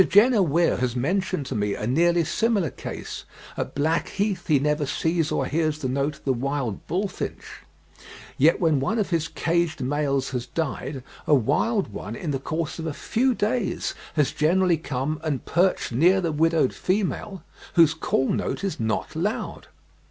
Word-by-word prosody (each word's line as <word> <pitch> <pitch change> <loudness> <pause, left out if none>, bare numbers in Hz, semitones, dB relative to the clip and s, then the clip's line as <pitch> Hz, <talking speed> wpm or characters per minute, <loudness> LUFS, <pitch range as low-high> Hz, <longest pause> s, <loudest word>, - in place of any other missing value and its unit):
Jenner 215 +3 +6
Weir 170 0 +2
has 125 -1 -1
mentioned 185 +4 0
to 135 - -4
me 105 -1 0
a - - -4
nearly 170 +7 +3
similar 200 - +1
case; - - -7 0.3
at - - -4
Blackheath 175 +5 0
he 150 - +5
never 150 +1 0
sees 160 +2 0
or - - 0
hears 155 -1 0
the 145 -4 -3
note 140 +3 -1
of - - -21
the 135 - +2
wild 130 -3 -3
bullfinch, 190 +4 -4 0.7
yet 155 +5 +4
when 160 -5 +3
one 210 +12 0
of 205 -4 -1
his 165 -2 +1
caged 170 -1 0
males 140 0 0
has 125 -2 -3
died, 140 -3 -3 0.2
a 150 - +6
wild 150 - +1
one 105 +2 -6
in 155 +4 -3
the 135 - -1
course 160 +4 -3
of 165 - -3
a 155 - -2
few 255 +2 +1
days 220 0 -1 0.2
has 150 -4 +2
generally 175 +2 +3
come 145 +1 -3
and 145 -5 -2
perched 180 -3 +1
near 175 +11 +4
the 170 -3 -1
widowed 160 -2 +2
female, 195 0 -2 0.3
whose 165 -3 +6
call 145 -4 0
note - - -1
is 195 - -2
not 110 +6 -2
loud. 195 +7 -3
160 Hz, 170 wpm, -25 LUFS, 140-180 Hz, 0.7 s, Jenner